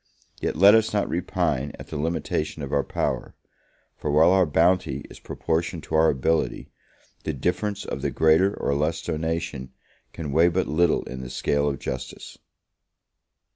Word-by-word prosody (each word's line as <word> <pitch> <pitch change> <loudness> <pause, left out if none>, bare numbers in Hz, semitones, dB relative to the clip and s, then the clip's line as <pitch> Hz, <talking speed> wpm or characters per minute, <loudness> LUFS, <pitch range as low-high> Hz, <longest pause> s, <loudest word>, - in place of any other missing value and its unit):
yet - - -1
let 100 +6 +7
us 110 -1 +3
not 105 -1 +1
repine 85 -6 -1
at - - -11
the - - -6
limitation 80 -1 -2
of 70 - -5
our 70 -1 +2
power; - - -3 0.6
for 75 - -4
while 80 +4 +5
our 95 -2 +4
bounty 80 -3 +2
is - - -12
proportioned 80 0 -2
to - - -9
our 80 0 +5
ability, 80 +4 0 0.5
the 80 - -2
difference 90 +8 -2
of - - -5
the - - 0
greater 80 +5 +3
or 70 - 0
less 75 +3 0
donation 80 -4 -3 0.4
can 75 -4 -6
weigh 80 +4 +5
but 95 +2 0
little 85 +2 +2
in 65 0 -7
the 65 - -7
scale 70 +2 0
of 70 - -3
justice. 65 0 -7
80 Hz, 165 wpm, -25 LUFS, 70-85 Hz, 0.6 s, let